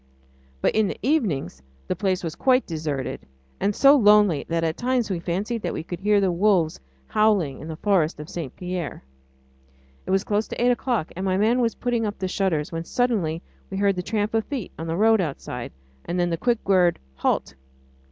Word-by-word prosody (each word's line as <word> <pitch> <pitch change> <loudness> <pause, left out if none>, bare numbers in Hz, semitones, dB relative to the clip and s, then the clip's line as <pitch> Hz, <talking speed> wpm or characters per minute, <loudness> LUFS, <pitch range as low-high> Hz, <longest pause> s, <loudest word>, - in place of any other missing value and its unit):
But - - +2
in 215 -1 +3
the - - -4
evenings 180 - 0 0.3
the - - -1
place 190 -3 -1
was 165 -2 -3
quite 255 +7 +2
deserted, 155 -6 -3 0.4
and 200 0 0
so 275 +1 +7
lonely 210 - +4
that 165 0 0
at 160 -1 0
times 245 -3 0
we 180 - -1
fancied 200 +7 -2
that - - -3
we - - -4
could 175 +1 -6
hear 205 +1 +3
the 190 -2 +2
wolves 175 -3 +2 0.3
howling 200 - +2
in 155 - -8
the 160 - -5
forest 170 -4 +1
of 150 - -7
St. 165 -8 -6
Pierre. 180 - -5 1.0
It - - -6
was 190 +1 +2
close 210 +1 -1
on - - -3
eight 245 +1 +4
o'clock, 240 -7 -1
and 185 - -4
my 190 -1 +1
man 230 +5 +3
was 230 -1 +1
putting 240 -3 -1
up 205 - -5
the 190 - -2
shutters, 180 -6 -1
when 165 0 -3
suddenly 185 -8 0 0.3
we 195 - -4
heard 200 -1 +2
the 180 - -2
tramp 210 +3 -1
of 225 -1 +2
feet 265 -9 -5
on 165 - -4
the 165 +1 -2
road 220 0 +4
outside, 135 -6 -5 0.3
and 180 - -2
then 175 0 +1
the - - +1
quick 235 +5 -1
word, 180 -3 +4 0.2
"Halt!" - - 0
190 Hz, 205 wpm, -24 LUFS, 165-220 Hz, 1.0 s, so